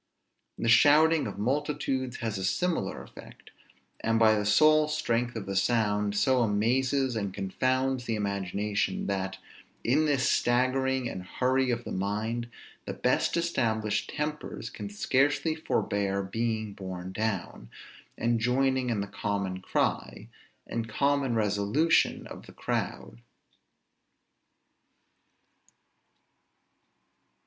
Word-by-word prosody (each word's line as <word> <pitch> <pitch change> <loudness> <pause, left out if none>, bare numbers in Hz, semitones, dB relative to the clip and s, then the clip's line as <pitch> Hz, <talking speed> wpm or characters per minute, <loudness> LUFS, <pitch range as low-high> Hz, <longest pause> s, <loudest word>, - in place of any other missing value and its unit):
The - - -2
shouting 150 +6 +5
of 100 - -7
multitudes 135 +1 -1
has 110 -4 -2
a - - -4
similar 175 - -1
effect; - - -14 0.5
and 115 0 +1
by 110 -1 +5
the 105 -1 0
sole 155 +8 +5
strength 120 -6 -1
of 110 - -4
the 100 - -4
sound, 105 -1 +1
so 125 +5 +3
amazes 125 +4 +1
and 100 -3 -2
confounds 130 +7 -1
the 115 - -1
imagination, 100 0 -2
that, 95 -1 -2 0.5
in 150 +6 +2
this 135 -3 +2
staggering 130 +1 +1
and 95 - -5
hurry 130 +7 0
of 120 -1 -1
the - - -7
mind, 110 +5 -2 0.4
the - - -5
best - - +1
established 115 -11 0
tempers 150 0 -4
can 205 - -7
scarcely 145 -5 +1
forbear 100 -10 -1
being 110 +1 -2
borne 95 -2 -7
down, 95 - -3 0.5
and 115 0 +1
joining 130 +2 +1
in 110 -4 0
the 100 - -4
common 100 -2 -3
cry, - - -2 0.4
and 115 -1 -4
common 140 +1 +1
resolution 105 +9 +2
of - - -10
the - - -13
crowd. - - -4
115 Hz, 115 wpm, -28 LUFS, 105-130 Hz, 0.5 s, shouting